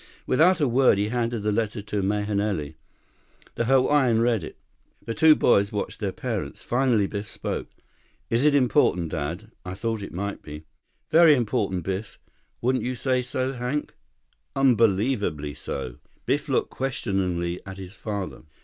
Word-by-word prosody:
Without 165 +7 +4
a 145 - +3
word, 125 -3 +4
he 105 +1 0
handed 115 -2 -1
the 105 - +1
letter 105 +1 -1
to 105 0 -3
Mahenili. 100 -5 -1 0.8
The 115 - -1
Hawaiian 130 -2 +4
read 115 -5 +2
it. - - -9 0.5
The 115 - -3
two 160 +3 +6
boys 100 -6 +3
watched 105 - -4
their - - -1
parents. - - -4
Finally 120 -4 +2
Biff 100 +1 -5
spoke. - - -5 0.6
"Is 115 +3 +1
it 150 -1 +4
important, 125 - +3
Dad? 85 +10 -4
I 90 0 -6
thought 115 +1 -2
it 100 - -7
might 100 +3 -4
be." 75 +1 -9 0.5
"Very 160 -2 +7
important, 100 -7 -1
Biff. 95 +4 -4 0.4
Wouldn't 130 +2 +1
you 125 +1 -2
say 130 +1 +1
so, 130 +1 -2
Hank?" 125 +4 -3 0.6
"Unbelievably 105 - +2
so." 65 -3 -5 0.3
Biff - - 0
looked - - +1
questioningly 95 -9 -2
at 95 0 -7
his 95 0 -9
father. 105 -3 -5
110 Hz, 150 wpm, -25 LUFS, 95-130 Hz, 0.8 s, Very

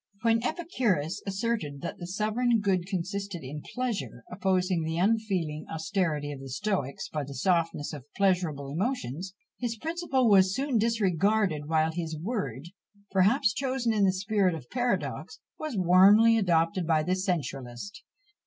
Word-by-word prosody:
When 230 0 +3
Epicurus 245 - -1
asserted 195 -8 -2
that - - -5
the 175 - -6
sovereign 220 +5 +1
good 190 -3 0
consisted 195 -1 -4
in 145 +3 -6
pleasure, 235 - -3
opposing 185 -1 +1
the 160 +1 -2
unfeeling 185 -6 0
austerity 160 -3 -1
of 140 - -7
the 135 0 -9
Stoics 145 -3 -2
by 150 -2 -3
the 140 0 -8
softness 165 0 0
of 140 -4 -8
pleasurable 180 -8 +1
emotions, 185 - -3 0.2
his 235 -2 -2
principle 315 -3 0
was 190 -2 +5
soon 270 -4 0
disregarded; 200 -6 +1
while 160 0 +2
his 160 -1 -4
word, 165 - -4 0.4
perhaps 205 +4 +3
chosen 255 -3 0
in 210 -2 +2
the 190 - +5
spirit 195 -1 +1
of 125 -6 -10
paradox, 245 -1 -2 0.2
was 305 -8 -4
warmly 195 +5 +6
adopted 170 -4 +1
by 155 -2 +3
the 180 +3 0
sensualist. 165 - -3
185 Hz, 145 wpm, -28 LUFS, 160-220 Hz, 0.4 s, warmly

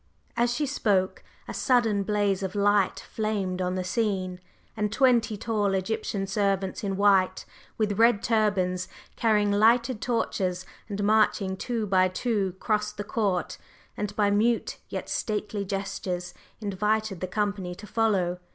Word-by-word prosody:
As 240 0 +2
she 295 +4 0
spoke, 205 -9 0 0.2
a - - -5
sudden 230 -5 +2
blaze 205 -1 0
of 190 0 -4
light 205 -1 +2
flamed 200 -4 -1
on 180 0 -1
the 185 - -1
scene, 185 -2 -1 0.4
and 210 -2 -1
twenty 235 -4 +3
tall 205 -2 0
Egyptian 195 0 -2
servants 195 -1 -1
in 195 -1 -2
white, 195 -2 +3 0.3
with 210 -2 0
red 230 -3 +4
turbans, 190 -5 +1 0.3
carrying 210 -3 +2
lighted 230 +2 +3
torches 190 -6 -1 0.2
and 205 0 -3
marching 205 -2 +2
two 230 +2 -2
by 185 -2 +3
two 195 0 -1
crossed 210 -1 -1
the 205 - -3
court, 200 -4 -1 0.4
and 205 0 -4
by 205 -1 +2
mute 225 +3 +1
yet - - -5
stately 210 -1 -2
gestures 185 -2 -4 0.3
invited 210 -1 -1
the 185 - -3
company 195 -2 -2
to 210 - -11
follow. 195 -5 +1
205 Hz, 140 wpm, -27 LUFS, 190-220 Hz, 0.4 s, red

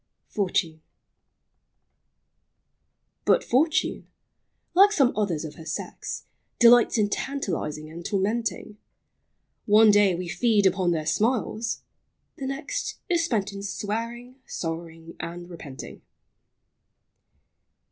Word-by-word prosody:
FROM 200 -2 0
" - - -15
FANNY." 160 -3 0 2.4
But - - +4
Fortune, 300 +6 +1 0.7
like 395 +4 +7
some 275 -11 +3
others 180 -7 -1
of 150 - -7
her 160 - -10
sex, 165 - -5 0.3
Delights 240 0 +6
in 210 -2 +3
tantalizing 175 - -3
and 165 +2 -9
tormenting. 210 +2 -2 0.9
One 215 +1 +7
day 205 -3 +4
we 180 +1 -4
feed 205 +3 +2
upon 185 -1 +3
their 160 -3 0
smiles, 225 +5 0 0.3
— - - -49
the 265 - -3
next 275 +3 -4
Is 340 -2 +2
spent 215 - -1
in 200 - -6
swearing, 230 +5 -4
sorrowing, 165 0 -6
and 175 +1 -6
repenting. 160 -6 -9
205 Hz, 110 wpm, -26 LUFS, 170-235 Hz, 2.4 s, like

